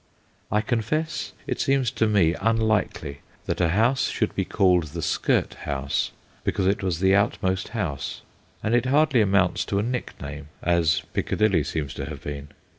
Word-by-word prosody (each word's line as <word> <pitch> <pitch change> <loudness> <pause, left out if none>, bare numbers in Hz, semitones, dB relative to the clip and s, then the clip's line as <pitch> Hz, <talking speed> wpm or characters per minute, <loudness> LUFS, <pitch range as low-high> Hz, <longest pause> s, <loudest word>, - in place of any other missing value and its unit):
I 105 +1 +3
confess 125 +9 -2
it - - -3
seems 135 -3 +2
to 115 -4 +1
me 95 -6 +3
unlikely 110 -9 0 0.3
that - - -1
a 85 - +3
house 115 +9 +2
should - - -1
be - - -1
called 90 -3 +3
the 80 +3 -6
skirt - - +1
house 70 -1 -2 0.3
because 95 - 0
it 100 +2 +2
was 90 -3 -1
the 95 0 +4
outmost 95 -2 +1
house, 70 -10 -3 0.4
and 110 - 0
it 120 +1 +3
hardly 140 -3 +4
amounts 100 -3 +2
to 100 - -1
a 100 - +1
nickname, 75 - -5 0.2
as 85 -3 +2
Piccadilly 100 -8 +2
seems 75 -4 -3
to - - -5
have - - -8
been. 70 0 -5
95 Hz, 165 wpm, -25 LUFS, 80-115 Hz, 0.4 s, the